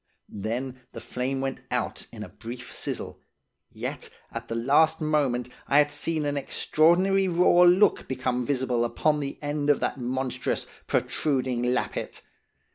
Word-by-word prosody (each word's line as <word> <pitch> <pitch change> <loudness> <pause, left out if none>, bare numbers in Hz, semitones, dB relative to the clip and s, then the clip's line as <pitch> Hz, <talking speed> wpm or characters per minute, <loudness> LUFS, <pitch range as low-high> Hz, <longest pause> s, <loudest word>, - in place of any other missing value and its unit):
Then 125 +5 -3
the - - -6
flame 130 +2 -3
went 135 -1 -3
out 125 -3 -3
in 110 -2 -7
a 100 - -9
brief 120 +5 -9
sizzle, - - -4 0.5
yet - - -5 0.2
at - - -6
the 115 - -3
last 145 +7 +3
moment 140 -6 0 0.2
I 140 - +3
had 150 0 +5
seen 155 +1 -1
an 145 0 -1
extraordinary 180 +7 +3
raw 175 0 +4
look 185 +3 +4
become 125 -1 -1
visible 125 -3 0
upon 150 +5 +1
the 140 -1 -4
end 145 0 -1
of 145 - +4
that - - -1
monstrous, 125 0 -2 0.2
protruding 130 -5 0
lappet. - - -3
135 Hz, 145 wpm, -26 LUFS, 125-150 Hz, 0.5 s, had